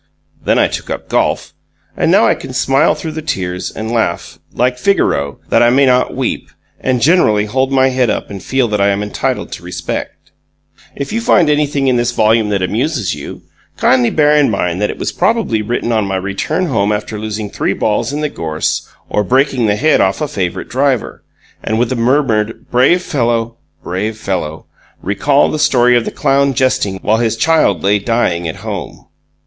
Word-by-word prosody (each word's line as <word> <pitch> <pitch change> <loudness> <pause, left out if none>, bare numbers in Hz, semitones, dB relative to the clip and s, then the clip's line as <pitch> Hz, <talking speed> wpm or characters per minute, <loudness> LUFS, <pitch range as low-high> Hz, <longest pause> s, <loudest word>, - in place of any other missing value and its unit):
Then - - +2
I - - +4
took - - -6
up - - -5
golf, - - 0 0.4
and - - +1
now - - +5
I - - +4
can - - -8
smile 135 +2 +2
through 160 - -5
the 160 +1 -5
tears 90 - -3
and 110 +1 -6
laugh, 110 -7 -2
like 125 +1 0
Figaro, 70 - +1
that - - +3
I 120 - +5
may 135 +3 +4
not 125 -1 +2
weep, 130 -2 -3 0.3
and 125 -2 0
generally 120 - +3
hold 130 +5 -1
my 135 -1 +3
head 130 -2 +1
up 105 - -3
and 100 -2 -7
feel 130 +2 0
that 105 -1 0
I 100 - +4
am 100 +1 0
entitled 105 - -3
to - - -8
respect. - - -6 0.6
If 140 +7 -5
you 230 - 0
find 175 -9 +3
anything 145 -2 +1
in 125 -2 +3
this 120 0 0
volume 110 -1 +2
that 100 -2 0
amuses 110 - -1
you, - - -8 0.3
kindly 125 -2 +3
bear 150 -1 +3
in 145 -2 +4
mind 90 -3 -1
that 105 - +1
it - - -5
was - - -3
probably 210 - 0
written 120 +2 -2
on 110 -3 +1
my 95 - -2
return 100 - -2
home 105 - 0
after 105 0 -3
losing 105 -1 -5
three - - -1
balls 105 +6 -1
in 150 +1 -3
the 150 - 0
gorse 80 - -3 0.2
or 105 - 0
breaking 130 +2 +1
the 105 - +2
head 155 +9 +3
off 95 0 +1
a 150 - -1
favourite 95 -9 -3
driver: 130 -2 -1 0.4
and, 110 - -1
with 120 +1 0
a - - 0
murmured 115 -3 0
"Brave 135 +9 +3
fellow! 115 -6 -1 0.3
Brave 105 +5 -3
fellow!" 90 -7 -4 0.4
recall 140 +9 +2
the 155 - -2
story 125 -3 +4
of 120 - +2
the - - -2
clown 140 0 +1
jesting 115 -7 +1
while 110 +1 +2
his 115 -1 0
child 115 - +2
lay 100 +1 +3
dying 100 -6 0
at 80 - -4
home. - - -6
115 Hz, 195 wpm, -15 LUFS, 105-135 Hz, 0.6 s, now